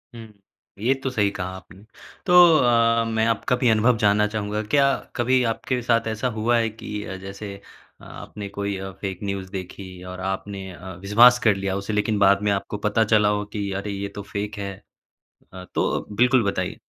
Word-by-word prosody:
हुँ। 110 -2 -11 0.5
ये 120 +6 +2
तो 135 - 0
सही 105 -5 +1
कहा 90 - -4
आपने। 95 +1 -14 0.4
तो 180 - +2 0.2
अ, 115 -3 +3
मैं 110 0 0
आपका 115 +2 +1
भी 125 -1 +2
अनुभव 115 +2 +3
जानना 105 -1 +3
चाहूँगा, 105 0 -3
क्या 140 +5 +3 0.2
कभी 125 +1 +2
आपके 125 +2 -3
साथ 115 -1 +1
ऐसा 110 +3 -2
हुआ 120 +2 +2
है 115 -1 +1
कि 110 +1 -11 0.3
जैसे 100 +1 -8 0.4
आपने 105 -1 -9
कोई 100 0 -3
अ, 95 0 -6
फैक 95 -3 -4
न्यूज 100 -2 -4
देखी 95 -1 -8
और 90 0 -8
आपने 95 0 -6
अ, 90 +2 -9
विश्वास 120 +5 +6
कर 110 -3 +4
लिया 95 0 -2
उसे, 100 +2 -4
लेकिन 105 0 0
बाद 100 0 +4
में 105 0 +1
आपको 100 +1 -2
पता 110 +2 +2
चला 105 -1 +4 0.2
कि 100 -2 -3
अरे 105 - -5
ये 100 0 -4
तो 100 - -5
फैक 105 +1 -4
है? 100 -1 -4 0.8
अ, 95 -1 -8
तो - - 0
बिल्कुल 125 +1 +4
बताइए। 95 -2 -4
105 Hz, 185 wpm, -23 LUFS, 100-115 Hz, 0.8 s, विश्वास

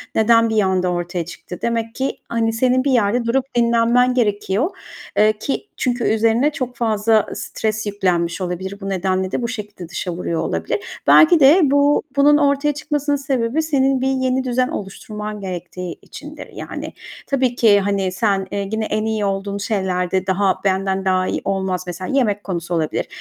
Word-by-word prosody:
neden 230 +1 +4
bir 220 -1 +2
anda 185 -1 +1
ortaya 175 0 -3
çıktı? 175 +1 -9
Demek 230 -1 -2
ki, 265 +1 -2
hani, 225 -1 0
senin 255 +2 +2
bir 280 - +1
yerde 235 0 +2
durup 255 +3 +1
dinlenmen 235 +1 +3
gerekiyor, 210 - 0 0.5
ııı, 215 +1 +5
ki 215 +6 -4
çünkü 245 -1 -1
üzerine 225 +6 +2
çok 255 -3 -4
fazla 220 -2 +2
stres 220 0 -3
yüklenmiş 180 -3 -1
olabilir. 185 +2 -4
Bu 195 - -4
nedenle 190 0 -1
de - - -1
bu 235 - -1
şekilde 210 -6 -7
dışa 175 +1 -4
vuruyor 170 -1 -2
olabilir. 415 - -3
Belki 335 +1 +7
de 295 +6 +7
bu 285 +1 +3
bunun 290 +1 +5
ortaya 285 0 +2
çıkmasının 290 0 -1
sebebi 270 0 -1
senin 270 -4 +1
bir 265 - +1
yeni 260 -1 0
düzen 250 0 +1
oluşturman 205 +1 -7 0.2
gerektiği 180 -2 -6
içindir, - - -10
yani. - - -7 0.3
Tabii 260 -3 +1
ki, 215 -4 +5
hani, 195 -1 0
sen, 195 0 0
eee, 200 0 -2
gene 220 +2 -3
en 215 0 -1
iyi 220 -2 -1
olduğun 200 0 -2
şeylerde 190 -3 -1
daha 190 0 +1
benden 190 0 0
daha 185 0 +2
iyi - - -2
olmaz 190 -2 -1
-mesela 185 +8 -4
yemek 205 -6 +1
konusu 175 -2 -4
olabilir. 160 -2 -1
215 Hz, 170 wpm, -20 LUFS, 190-250 Hz, 0.5 s, Belki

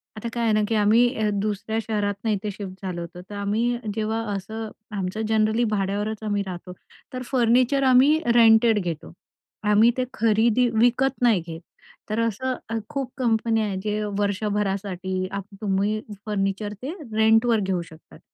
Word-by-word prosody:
आता 215 +2 -5
काय 235 - -1
आहे 225 -2 +2
ना 215 - +3
की 225 - 0
अ, - - +3
आम्ही 220 +1 +3
दुसऱ्या 215 +1 -2
शहरातून 210 0 -2
इथे 205 +1 -2
शिफ्ट 195 -1 -8
झालो 175 -2 -3
होतो, 170 +1 -8
तर 205 - -7
आम्ही 220 +4 0 0.2
जेव्हा 220 +1 -1
असं 220 +3 -5 0.3
आमचं 190 +3 -3
जनरली 220 +1 +2
भाड्यावरच 205 +2 -2
आम्ही 205 -1 0
राहतो, 180 0 -7 0.4
तर 255 - -4
फर्निचर 255 +2 +3
आम्ही 265 +4 +5 0.2
रेंटेड 225 -1 +6
घेतो. 170 -4 -5 0.5
आम्ही 210 +3 +5
ते 255 - +1
खरेदी 230 +2 +3
विकत 245 +4 +2
नाही 230 -7 +4
घेत, 165 0 -7 0.5
तर 215 - -1
असं 230 +3 -1 0.3
खूप 270 -2 -3
कंपन्या 225 -2 +1
आहेत, 195 -2 -3
जे 210 0 -1 0.2
वर्षभरासाठी 200 -2 -1
आप 200 0 -4 0.2
तुम्ही 205 +1 0 0.3
फर्निचर 205 0 -2
ते 280 +5 -4 0.2
रेंटवर 225 +1 +4
घेऊ 190 -3 -1
शकतात. 165 -1 -14
215 Hz, 155 wpm, -24 LUFS, 200-230 Hz, 0.5 s, रेंटेड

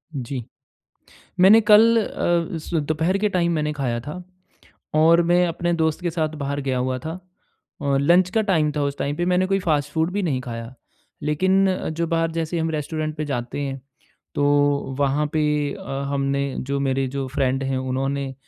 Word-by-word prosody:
जी। 125 -1 -4 1.0
मैंने 205 +5 +7
कल 220 +2 +6
अ, 170 0 -1
स 160 - -9
दोपहर 160 +6 0
के 210 +1 +1
टाइम 170 -2 +1
मैंने 150 -1 -1
खाया 125 -5 -2
था। 150 +9 -7 0.7
और 165 +2 +5
मैं 175 0 +4
अपने 175 +1 -1
दोस्त 160 0 0
के 175 - 0
साथ 160 -1 -1
बाहर 140 +1 -2
गया 130 -2 -1
हुआ 130 0 -1
था। 160 +7 -6 0.6
और 140 -1 +1
लंच 175 +5 +4
का 220 +2 +1
टाइम 160 -7 +2
था 150 -1 -2
उस 140 0 -2
टाइम 145 +1 -2
पे 175 - -1
मैंने 185 +1 +2
कोई 195 0 +1
फ़ास्ट 150 -4 0
फ़ूड 160 +2 0
भी 205 0 -1
नहीं 140 -7 0
खाया, 115 -1 -7 0.5
लेकिन 190 +6 +2
अ, 185 - -2
जो 165 +1 -2
बाहर 165 0 0
जैसे 165 +1 -2
हम 160 0 -1
रेस्टोरेंट 155 0 -3
पे 155 - -2
जाते 125 -1 -4
हैं। 135 -1 -4 0.5
तो 145 - +1 0.5
वहाँ 145 +2 +1
पे 155 -1 +1 0.3
अ, 135 0 -5
हमने 140 -1 -1 0.2
जो 140 0 0
मेरे 135 -1 0
जो 135 -1 -2
फ्रेंड 135 0 0
है 135 0 -1
उन्होंने 135 +1 -2
150 Hz, 185 wpm, -22 LUFS, 135-175 Hz, 1.0 s, मैंने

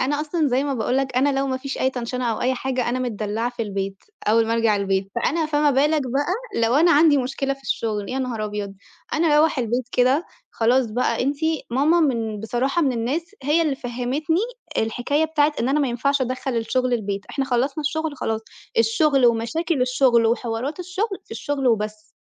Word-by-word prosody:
أنا 290 +2 0
أصلًا 310 -1 0
زي 260 +3 +1
ما 280 -2 -1
باقول 245 +2 0
لك 265 -2 -1
أنا 270 +1 +2
لو 275 - 0
ما 260 -1 -1
فيش 270 +1 -5
أي 260 - +2
تنشنة 250 0 -4
أو 215 - -5
أي 260 +1 +1
حاجة 255 -1 -2
أنا 250 +1 -1
متدلعة 225 -1 -2
في 240 -2 -4
البيت، 195 -1 -4 0.2
أول 225 +1 +4
ما 225 - 0
أرجع 225 -2 +2
البيت 195 -1 -1
فأنا 315 +7 0
فما 295 -1 +2
بالك 295 +3 +3
بقى 290 - -2
لو 230 +3 +3
أنا 340 +4 +5
عندي 295 -1 +5
مشكلة 270 +1 -1
في 275 - -21
الشغل، 210 -5 -2
يا 265 - -2
نهار 240 -5 -2
أبيض 205 -1 -4 0.4
أنا 325 +2 +2
أروَّح 310 -1 +3
البيت 245 +1 -1
كده 260 +6 +3 0.3
خلاص 240 +2 +2
بقى 245 +2 0
أنتِ 280 +3 0 0.3
ماما 295 +8 +3
من 225 -8 0
بصراحة 250 +9 0
من 270 -4 +2
الناس 285 - -3
هي 305 +5 +3
اللي 295 -4 0
فهّمتني 255 +7 -1 0.4
الحكاية 245 +7 0
بتاعة 305 -1 +2
إن 240 - 0
أنا 295 +2 +2
ما 275 - +1
ينفعش 280 +4 0
أدخَّل 255 0 -2
الشغل 255 +2 0
البيت، 200 -4 -1
إحنا 275 - -1
خلّصنا 265 +4 0
الشغل 310 0 -2
خلاص، 220 -2 -2 0.4
الشغل، 260 +3 +4
ومشاكل 245 +7 0
الشغل، 250 -2 +3
وحوارات 240 +7 -2
الشغل، 385 +3 -3
في - - -31
الشغل 285 -3 -2
وبس، 215 -2 -1
255 Hz, 195 wpm, -22 LUFS, 230-290 Hz, 0.4 s, أنا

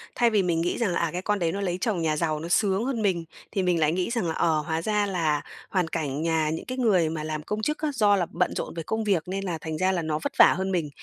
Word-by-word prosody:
Thay 240 -1 +4
vì 210 -4 +2
mình 165 -2 +1
nghĩ 175 - -1
rằng 225 -6 0
là - - 0
"À, 170 - +1
cái 180 - -3
con 205 +1 0
đấy 170 -2 +1
nó 200 +3 -3
lấy 180 -2 -1
chồng 205 -7 0
nhà 155 -2 0
giàu, 155 -2 0
nó 165 - -5
sướng 200 +3 +2
hơn 255 -4 -1
mình." 185 -5 +1 0.3
Thì 195 -3 0
mình 180 -2 +2
lại 155 -1 +3
nghĩ 180 +4 -1
rằng 235 -7 -1
là 160 - -1
"Ờ, 160 -2 +2
hóa 160 +1 -2
ra 210 +1 +1
là 165 -6 0 0.3
hoàn 180 -4 +1
cảnh 150 -4 -3
nhà 160 -2 +1
những 160 - -4
cái 255 - -5
người 195 -10 +3
mà 155 -1 -4
làm 155 -1 -4
công 210 +4 -3
chức 300 +6 -1
á, 310 - 0
do 210 -4 +4
là 185 -3 +1
bận 180 +1 0
rộn - - -4
về 165 - -5
công 220 +7 -2
việc, 195 -6 +1
nên 195 +2 -3
là 175 -4 -2
thành 160 -1 -4
ra 185 +3 +2
là 180 -2 0
nó 155 -1 -2
vất - - -2
vả - - +8
hơn 190 +1 -1
mình." 170 -5 -1
180 Hz, 310 wpm, -26 LUFS, 160-205 Hz, 0.3 s, vả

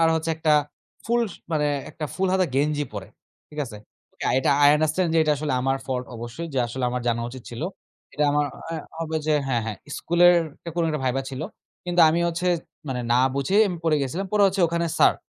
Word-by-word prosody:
আর 165 - +5
হচ্ছে 160 0 -1
একটা 160 -1 +2 0.5
ফুল 235 +2 +2
স - - -12 0.2
মানে 150 -2 +2 0.2
একটা 155 - -6
ফুল 190 0 0
হাতা 190 0 +3
গেঞ্জি 145 +1 +1
পরে, 100 -3 -6 0.4
ঠিক 150 - -12
আছে? 115 -5 -9 0.4
ওকে, - - -8
এটা 130 - +2
আই 145 - +8
আন্ডারস্ট্যান্ড 155 +3 +1
যে - - +4
এটা 155 - +2
আসলে 150 -1 -2
আমার 135 +1 +1
ফল্ট 125 -1 -2
অবশ্যই। 120 +9 -6
যে - - +1
আসলে 125 +2 -3
আমার 125 0 -2
জানা 115 0 +1
উচিত 130 0 -9
ছিল। 120 +4 -6 0.5
এটা 150 - +1
আমার 145 0 +2 0.2
অ্যা 165 -1 -3 0.2
হবে 160 -1 -2
যে 155 - +3
হ্যাঁ, 120 -4 0
হ্যাঁ, 110 -2 -4 0.2
স্কুলের 175 +1 +5 0.2
একটা 170 - -8
কোনো 170 - +2
একটা 155 -2 -2
ভাইবা 130 +1 0
ছিল। 130 0 -6 0.4
কিন্তু 175 0 +1
আমি 165 +2 +1
হচ্ছে 170 +2 -1 0.4
মানে 125 -2 -2
না 120 - +4 0.2
বুঝেই 190 +10 +3
আমি 180 - -3
পড়ে 155 -2 +3
গেছিলাম। 165 +9 -3
পরে 210 -1 +4
হচ্ছে 190 0 0
ওখানে 170 0 0
স্যার, - - +6
155 Hz, 215 wpm, -24 LUFS, 130-170 Hz, 0.5 s, আই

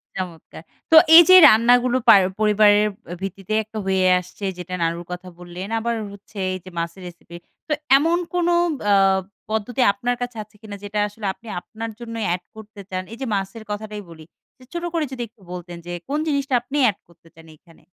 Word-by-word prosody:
চমৎকার। 175 -3 -7 0.3
তো 320 - +7 0.2
এইযে 345 +2 +9
রান্নাগুলো 245 +3 +4
পার 200 -3 +9 0.2
পরিবারের 210 0 +4 0.2
আ - - -4
ভিত্তিতে 195 +2 -5
একটা 220 +1 -10
হয়ে 190 -1 +1
আসছে। 180 +3 -9
যেটা 180 0 -8
নানুর 170 +1 -2
কথা 180 +1 -7
বললেন। 175 +2 -8
আবার 235 +1 -2 0.2
হচ্ছে 200 +1 -15 0.2
এইযে 185 0 -8
মাছের 170 +3 -5
রেসিপি। 170 0 -13 0.3
তো 305 - 0 0.2
এমন 330 +4 +1 0.2
কোনো 350 -1 +1 0.3
বা 205 - 0 0.6
পদ্ধতি 220 +4 -2
আপনার 245 +4 -2
কাছে 245 -2 -5
আছে 210 +1 -27
কিনা 210 -2 -8
যেটা 205 +1 -3
আসলে 210 +1 -9
আপনি 230 - -19
আপনার 225 +3 -8
জন্যই 230 -2 -5
এড 180 - -5
করতে 215 -2 -12
চান? 185 0 -3
এইযে 255 +4 -6
মাছের 195 +3 -5
কথাটাই 210 0 -5
বলি। 160 -1 -13 0.3
যে - - -17
ছোট 345 - -4
করে 325 -2 0
যদি 260 -2 -6
একটু 225 -1 -31
বলতেন 175 -1 -8
যে 175 - -7 0.2
কোন 295 - -1
জিনিসটা 280 -3 -1
আপনি 275 +4 -5
এড 200 - -5
করতে 170 -1 -24
চান 165 0 -16
এইখানে? 165 +2 -23
210 Hz, 185 wpm, -21 LUFS, 185-235 Hz, 0.6 s, এইযে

